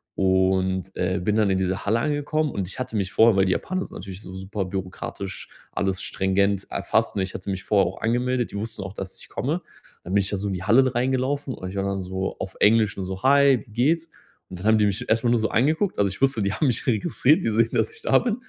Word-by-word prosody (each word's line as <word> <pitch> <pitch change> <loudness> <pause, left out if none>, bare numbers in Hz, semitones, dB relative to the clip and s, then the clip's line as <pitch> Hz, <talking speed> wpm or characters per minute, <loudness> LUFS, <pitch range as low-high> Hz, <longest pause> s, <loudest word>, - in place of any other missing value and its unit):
Und, 95 0 +1
äh, 90 +1 0
bin 105 +2 +1
dann 105 -2 +3
in 95 - +2
diese 95 +1 -1
Halle 110 +3 +2
angekommen. 150 0 0
Und 95 -3 -3
ich 100 - -8
hatte 115 -3 -3
mich 100 +1 -2
vorher 110 -1 +5
weil, 95 - +4
die 90 - +2
Japaner 185 0 -2
sind - - -13
natürlich 95 +1 -8
so 95 - -10
super 95 +1 -4
bürokratisch, 95 +1 -6 0.2
alles 95 -1 -1
stringent 100 +1 0
erfasst. - - 0
Ne, 95 - +1
ich 95 - -5
hatte 95 +1 -6
mich 95 0 -3
vorher 100 -4 +3
auch 95 - -7
angemeldet, 125 +1 0
die 100 - -5
wussten 110 -1 -5
auch, 95 +1 -7
dass 95 -2 -7
ich - - -12
komme. 155 +7 -2 0.4
Dann 90 - -6
bin 100 - +5
ich 95 - -2
da 100 - -1
so 100 +2 -3
in - - -2
die 90 - -5
Halle 130 +5 +4
reingelaufen 130 +2 0
und 95 - -6
ich 100 - -8
war 95 - 0
dann 100 -1 -2
so 95 +1 -4
auf 95 - -5
Englisch 110 -1 +4
nur 95 - -3
so: 95 +3 -6
„Hi, 140 -1 +5
wie 110 - -19
geht's?“ 160 +8 +1 0.4
Und 90 -1 -8
dann 100 - -7
haben 110 0 +5
die 105 - +4
mich 100 - -2
erstmal 115 +2 +2
nur 120 - +3
so 110 - +1
angeguckt. 155 - +1
Also, 100 -1 +3
ich 95 - -6
wusste, 135 -5 +2
die 100 - 0
haben 145 - +1
mich 125 - 0
registriert, 140 +4 +2
die 115 - +1
sehen, 115 +1 +3
dass 440 - 0
ich 450 - -12
da - - +4
bin. 230 -3 -1
105 Hz, 260 wpm, -24 LUFS, 95-125 Hz, 0.4 s, vorher